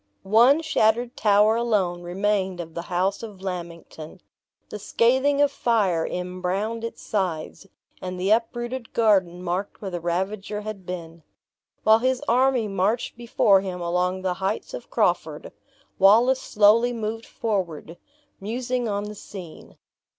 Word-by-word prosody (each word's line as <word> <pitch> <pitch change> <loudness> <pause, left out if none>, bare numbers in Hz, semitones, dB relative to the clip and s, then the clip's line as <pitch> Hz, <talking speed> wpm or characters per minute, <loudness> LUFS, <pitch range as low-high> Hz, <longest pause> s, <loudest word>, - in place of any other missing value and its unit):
One 240 +10 +5
shattered 240 -5 +1
tower 210 +1 +4
alone 205 -7 0
remained 190 +1 -1
of 165 -1 -7
the 170 - -4
house 185 +3 0
of 210 -4 -9
Lammington. 170 -2 -7 0.5
The 210 - -7
scathing 260 +7 +2
of 285 - +2
fire 195 -9 +1
embrowned 185 +5 -3
its 230 - -6
sides, 185 -2 -3 0.3
and 180 0 -5
the 190 +3 0
uprooted 240 +2 -1
garden 190 -6 +2
marked 180 +3 -3
where 195 -2 -6
the 175 - -3
ravager 190 +5 -3
had 210 -3 -8
been. 170 -2 -7 0.6
While 220 +1 +6
his 255 +2 0
army 250 -1 +3
marched 200 +4 -1
before 225 -4 +3
him 185 -2 -5
along 180 +2 -1
the 185 -1 0
heights 205 - -2
of - - -8
Crawford, - - -1 0.5
Wallace 235 +7 +5
slowly 220 +4 +4
moved 225 0 -4
forward, 175 -7 -3 0.4
musing 245 +4 -2
on 200 0 -2
the 210 0 -6
scene. 185 -5 -11
205 Hz, 135 wpm, -24 LUFS, 180-230 Hz, 0.6 s, While